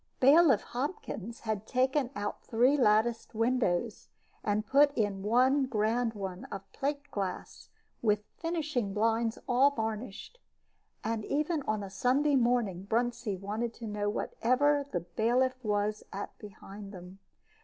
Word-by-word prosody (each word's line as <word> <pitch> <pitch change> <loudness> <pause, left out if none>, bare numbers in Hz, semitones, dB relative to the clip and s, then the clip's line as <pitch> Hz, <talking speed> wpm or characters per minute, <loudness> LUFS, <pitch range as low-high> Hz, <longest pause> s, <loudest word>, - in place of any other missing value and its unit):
Bailiff 275 -3 +6
Hopkins 240 - -5
had 220 -2 -3
taken 260 +1 +1
out 205 0 -4
three 245 +5 +3
latticed 225 -2 +2
windows, 230 -3 0 0.4
and 210 +1 0
put 285 +5 +5
in 205 -3 0
one 255 +6 +3
grand 225 0 0
one 190 -2 -5
of 195 -1 -7
plate 285 +1 -3
glass, 195 -3 -5 0.3
with 210 -2 +2 0.2
"finishing" 305 - -2
blinds 225 +1 +1
all 260 +3 +5
varnished. 225 - -5 0.6
And 225 -1 -2
even 305 +2 0
on 215 -1 0
a 195 - -6
Sunday 275 +7 +2
morning 235 -7 +1
Bruntsea 235 -3 0
wanted 215 +5 -3
to 235 - -8
know 205 -1 -2
what 205 - -3
ever 285 +4 +3
the 175 - -1
bailiff 250 +7 0
was 210 0 0
at 200 - -6
behind 200 -1 -10
them. 180 +1 -11
230 Hz, 135 wpm, -30 LUFS, 210-260 Hz, 0.6 s, Bailiff